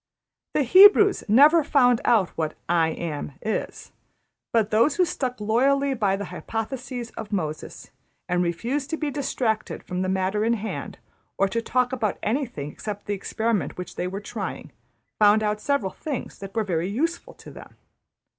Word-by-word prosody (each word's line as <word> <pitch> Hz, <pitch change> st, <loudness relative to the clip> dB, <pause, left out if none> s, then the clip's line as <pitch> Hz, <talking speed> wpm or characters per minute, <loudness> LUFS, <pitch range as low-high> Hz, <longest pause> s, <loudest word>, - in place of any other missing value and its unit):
'' -, -, -65 dB
The 295 Hz, -, +3 dB
Hebrews 395 Hz, -, +7 dB
never 295 Hz, +9 st, +6 dB
found 250 Hz, -5 st, +3 dB
out 210 Hz, -7 st, +3 dB
what 155 Hz, -2 st, -3 dB
``I 165 Hz, -2 st, +1 dB
Am'' 150 Hz, -3 st, -4 dB
is; 220 Hz, -, -4 dB, 0.6 s
but 220 Hz, -2 st, +1 dB
those 230 Hz, +7 st, +3 dB
who 365 Hz, -, +3 dB
stuck 250 Hz, -7 st, -3 dB
loyally 270 Hz, +6 st, +2 dB
by 205 Hz, -6 st, +1 dB
the 200 Hz, +1 st, -5 dB
hypotheses 240 Hz, +4 st, -5 dB
of 220 Hz, -2 st, -8 dB
Moses, 155 Hz, -6 st, -4 dB, 0.4 s
and 180 Hz, 0 st, +1 dB
refused 240 Hz, -, -2 dB
to 320 Hz, -, -2 dB
be 300 Hz, -2 st, -2 dB
distracted 245 Hz, -6 st, -2 dB
from 180 Hz, 0 st, -4 dB
the 185 Hz, -, -1 dB
matter 190 Hz, +2 st, 0 dB
in 230 Hz, +1 st, +2 dB
hand, 220 Hz, -1 st, -5 dB, 0.4 s
or 195 Hz, -, +3 dB
to 230 Hz, +3 st, -1 dB
talk 250 Hz, +2 st, 0 dB
about 225 Hz, -6 st, -1 dB
anything 220 Hz, -, -2 dB
except 205 Hz, +3 st, -7 dB
the 205 Hz, -, -2 dB
experiment 220 Hz, +1 st, -2 dB
which 180 Hz, -, -7 dB
they 180 Hz, -, -2 dB
were 195 Hz, +2 st, -5 dB
trying, 205 Hz, -7 st, -6 dB, 0.5 s
found 210 Hz, +1 st, +5 dB
out 210 Hz, 0 st, -1 dB
several 255 Hz, -9 st, 0 dB
things 290 Hz, -5 st, -6 dB
that 195 Hz, +2 st, -9 dB
were 220 Hz, -, +1 dB
very 175 Hz, -2 st, -1 dB
useful 335 Hz, -, -2 dB
to -, -, -13 dB
them. -, -, -13 dB
220 Hz, 170 wpm, -24 LUFS, 195-260 Hz, 0.6 s, Hebrews